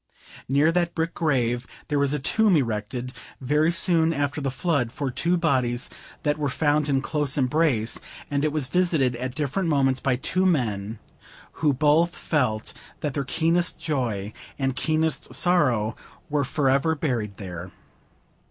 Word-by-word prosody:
Near 145 +4 +4
that 175 0 0
brick 165 0 -1
grave 125 -6 0 0.2
there 145 -1 0
was 140 -1 +2
a 150 - 0
tomb 205 +8 +3
erected, 120 -1 -2 0.3
very 150 +5 +2
soon 170 -2 +3
after 145 +1 -1
the 135 - -1
flood, 130 -3 0
for 135 0 -3
two 170 +7 +1
bodies 130 -7 0 0.3
that 150 0 0
were 145 -2 0
found 150 +1 +1
in 135 -1 +2
close 145 -1 -1
embrace; 130 -4 +1 0.3
and 140 0 0
it 155 - +1
was 150 -3 0
visited 160 -7 +1
at 125 +1 -4
different 155 +4 -1
moments 135 -3 +2
by 130 -1 +1
two 185 +8 0
men 110 - 0 0.6
who 150 -2 +4
both 155 +5 +3
felt 125 -8 -1 0.3
that 145 -2 -2
their 140 - -1
keenest 170 +5 +1
joy 120 -10 -2 0.2
and 135 -2 -1
keenest 155 -4 -1
sorrow 130 -11 +2 0.4
were 145 -1 +2
forever 140 +3 +1
buried 120 - -2
there. 90 -2 -7
140 Hz, 150 wpm, -25 LUFS, 125-160 Hz, 0.6 s, Near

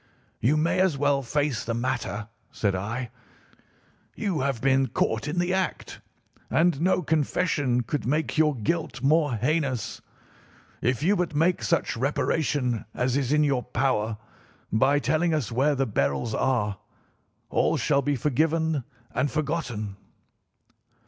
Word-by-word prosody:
"'You 135 +7 +2
may 165 +4 +1
as 185 -6 +2
well 140 0 +2
face 140 -1 -1
the 115 - -2
matter,' 115 -5 -2 0.2
said 100 -3 0
I; 110 +6 -3 1.0
'you 195 -8 -1
have 135 -3 -1
been 135 +1 +3
caught 110 +2 -1
in 155 +4 -3
the 175 +1 +1
act, 190 -1 -2 0.5
and 165 -3 +2
no 185 +1 +2
confession 145 -5 +1
could 135 +2 -3
make 150 +4 0
your 155 -2 +3
guilt 135 +2 -2
more 150 -2 +3
heinous. 130 -2 -1 0.8
If 125 +3 0
you 195 +5 +4
but 175 -5 -1
make 170 +4 +2
such 165 - 0
reparation 135 -1 0
as 125 0 0
is 135 -2 0
in 150 0 +4
your 140 -4 +1
power, 120 -4 0 0.6
by 135 +6 +4
telling 160 +3 +1
us 130 -7 -2
where 140 +5 +2
the 135 0 +1
beryls 70 - -1
are, 105 -8 0 0.7
all - - +2
shall 140 -2 +2
be 145 +1 0
forgiven 155 +2 +1 0.3
and 130 +4 +1
forgotten. 135 -10 -3
140 Hz, 140 wpm, -26 LUFS, 120-155 Hz, 1.0 s, you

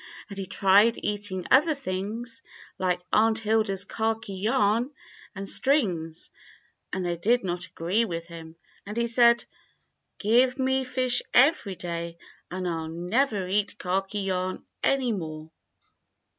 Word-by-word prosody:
And 200 - -7
he 190 - -4
tried 205 +5 +4
eat 205 0 -1
ing 185 -1 -4
other 300 +4 +5
things 235 +2 -5 0.4
like 180 -1 0
Aunt 220 +1 +4
Hilda's 215 -3 0
khaki 220 -1 -2
yarn 215 +3 +1 0.5
and 195 0 -6
strings, 180 - 0 0.6
and 185 -1 -2
they 175 -1 -1
did 235 +8 +2
not 175 -1 -3
agree 185 +8 0
with 170 -4 -4
him, 165 -1 -11 0.3
and 210 +2 -7
he 235 - +2
said, 235 0 +4 0.7
*Give 245 +5 +3
me 265 0 +1
fish 255 -1 +2
every 245 - +4
day 170 -1 -5 0.3
and 185 +1 -3
I'll 165 -2 -3
never 190 +6 0
eat 200 +2 -1
khaki 195 +3 -2
yarn 185 -1 -2 0.2
any 265 -3 +2
more.' 155 -4 -6
200 Hz, 135 wpm, -26 LUFS, 180-235 Hz, 0.7 s, other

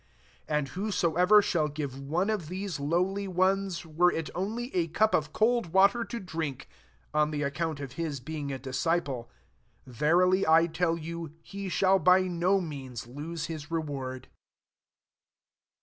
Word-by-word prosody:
42 - - -4
And 145 -2 -1
whoso 185 -2 -1
ever 190 +5 +6
shall 160 -6 +1
give 145 -3 -5
one 165 +9 0
of 195 -8 -2
these 185 -1 -4
lowly 180 +7 0
ones, 185 0 0
were 170 +3 +3
it 160 -1 -4
only 225 +7 -3
a 170 -2 +2
cup 215 +7 +2
of 155 -1 +1
cold 225 -4 +1
water 200 +5 +5
to 235 +1 -5
drink, 160 - -5 0.5
on 150 0 +3
the 150 -1 -2
account 155 +1 -2
of 140 -3 -6
his 150 -1 -3
heing 145 +2 -5
a 135 - -3
disciple, 130 -1 -1 0.6
verily 175 - +3
I 165 +1 +6
tell 165 0 0
you, 165 -1 -6
he 200 -1 -6
shall 190 +1 +3
bj 185 +2 +5 0.4
ik> - - -5
means 130 -6 -7
lose 150 +6 -5
his 155 -1 -6
reward." 140 -6 -4
165 Hz, 155 wpm, -29 LUFS, 145-185 Hz, 0.6 s, ever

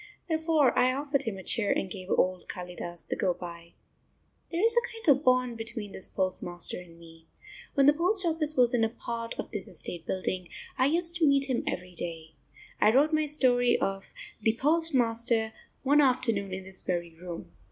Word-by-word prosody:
Therefore 320 -5 +2
I 255 +1 +3
offered 280 0 -1
him 215 -4 -3
a 190 - -9
chair 205 +2 0
and - - 0
gave 185 0 -8
old 185 0 +1
Kalidas 175 -1 -7
the - - -2
go 180 -2 0
by. 170 -1 -10 0.8
There 340 +3 -1
is 455 +1 +4
a 475 0 +1
kind 450 -3 -4
of 275 - -8
bond 255 -3 +2
between 225 -2 -6
this 190 - -7
postmaster 180 -3 +1
and 170 -2 -15
me. 165 -1 -16 0.5
When 275 - +4
the 290 - +7
post 365 +5 +3
office 315 -3 -1
was 245 0 +4
in 235 -2 +2
a 225 - +2
part 230 0 -6
of - - -6
this 205 -4 -5
estate 170 -2 -7
building, 185 -1 -3 0.3
I 260 - +3
used 335 +3 +2
to 325 -3 +3
meet 275 -1 +3
him 245 - 0
every 180 0 -4
day. 165 -2 -7 0.5
I 210 - +5
wrote 290 +6 +3
my 310 0 +2
story 245 -4 +3
of 195 0 -3 0.3
"The 220 +1 +1
Postmaster" 240 -8 +2 0.3
one 290 +2 +5
afternoon 230 -7 +1
in 190 0 -5
this 190 0 0
very 170 -2 -3
room. 170 +1 -9
230 Hz, 190 wpm, -28 LUFS, 185-285 Hz, 0.8 s, the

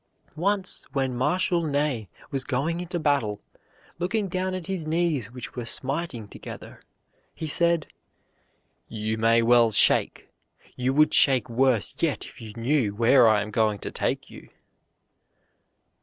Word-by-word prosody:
Once 195 +3 +1
when 135 -3 -1
Marshal 175 +7 +1
Ney 145 - -1 0.2
was 135 -2 -2
going 150 +7 -2
into 180 0 -4
battle, 140 -10 0 0.6
looking 195 +4 -1
down 185 +1 -2
at 185 -3 -6
his 185 -5 -4
knees 160 -8 0
which 125 -2 -9
were 125 - -4
smiting 130 -1 -3
together, - - -10 0.5
he 160 - -5
said, 170 +1 +2 1.0
"You 110 0 -3
may 115 +1 +3
well 120 0 +5
shake; 105 - +2 0.5
you 125 +1 0
would 150 +3 +3
shake 130 -4 +4
worse 120 -3 +1
yet 160 -4 -1
if 130 - -13
you 110 -2 -8
knew 115 -3 0
where 120 +2 +5
I 105 -2 +3
am 105 - -8
going 110 -1 +1
to - - -7
take - - -2
you." - - -13
135 Hz, 140 wpm, -25 LUFS, 115-165 Hz, 1.0 s, well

